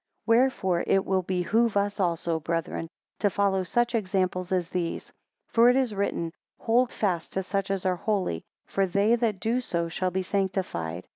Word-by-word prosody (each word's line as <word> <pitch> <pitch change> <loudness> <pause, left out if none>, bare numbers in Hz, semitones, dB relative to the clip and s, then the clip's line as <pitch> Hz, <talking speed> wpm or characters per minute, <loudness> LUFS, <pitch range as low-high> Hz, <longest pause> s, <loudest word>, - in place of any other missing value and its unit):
12 230 +1 +4
Wherefore 190 -9 +1
it 195 - +3
will 190 -1 +1
behove 195 +5 +1
us 205 +1 0
also, 170 -2 0
brethren, 165 +1 -3 0.3
to 205 - +3
follow 195 -1 +1
such 240 +6 0
examples 185 -4 -1
as 180 -2 0
these; 170 -2 -3 0.3
for 235 +1 +5
it 250 - +4
is 260 -5 +1
written, 180 -4 -2 0.3
Hold 235 +2 +2
fast 180 -6 -1
to 190 - -1
such 195 +1 -2
as 195 -1 -2
are 185 -1 +1
holy; 190 - -1 0.2
for 195 -1 0
they 200 +5 +3
that 225 -5 0
do 230 +5 0
so 170 -7 -2
shall 185 +3 -1
be 185 +1 -2
sanctified. 185 - -2
190 Hz, 175 wpm, -27 LUFS, 180-210 Hz, 0.3 s, for